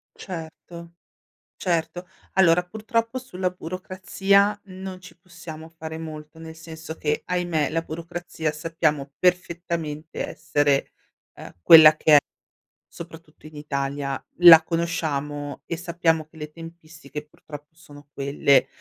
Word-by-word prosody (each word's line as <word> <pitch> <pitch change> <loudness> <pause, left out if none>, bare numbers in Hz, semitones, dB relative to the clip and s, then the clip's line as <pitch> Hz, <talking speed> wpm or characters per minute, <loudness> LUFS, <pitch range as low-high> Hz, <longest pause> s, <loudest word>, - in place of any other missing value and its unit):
Certo, 170 -1 -9 0.6
certo. 175 0 -2 0.3
Allora, 180 -2 +4
purtroppo, 230 +5 -2
sulla 185 -8 -3
burocrazia 190 +3 0
non 190 -1 -9
ci 185 -1 -14
possiamo 170 -3 -11
fare 160 -1 -8
molto, 155 -1 -9
nel 160 0 -10
senso 160 0 -9
che, 150 -2 -2
ahimè, 175 -5 -1
la 165 +1 0
burocrazia 165 -1 -5
sappiamo 150 -3 -2
perfettamente 170 -3 -2
essere, 145 -3 0 0.4
ehm, - - -12
quella 155 - +9
che 155 - +3
è, - - +10 0.7
soprattutto 165 -2 -13
in 155 - -15
Italia. 140 -1 -3 0.2
La 170 -2 +10
conosciamo 150 -4 -3
e 170 - -4
sappiamo 170 -2 0
che 155 - -26
le 150 -1 -7
tempistiche, 160 -2 -10
purtroppo, 150 0 -13
sono 145 -3 -16
quelle. 140 0 +2
165 Hz, 120 wpm, -24 LUFS, 150-175 Hz, 0.7 s, è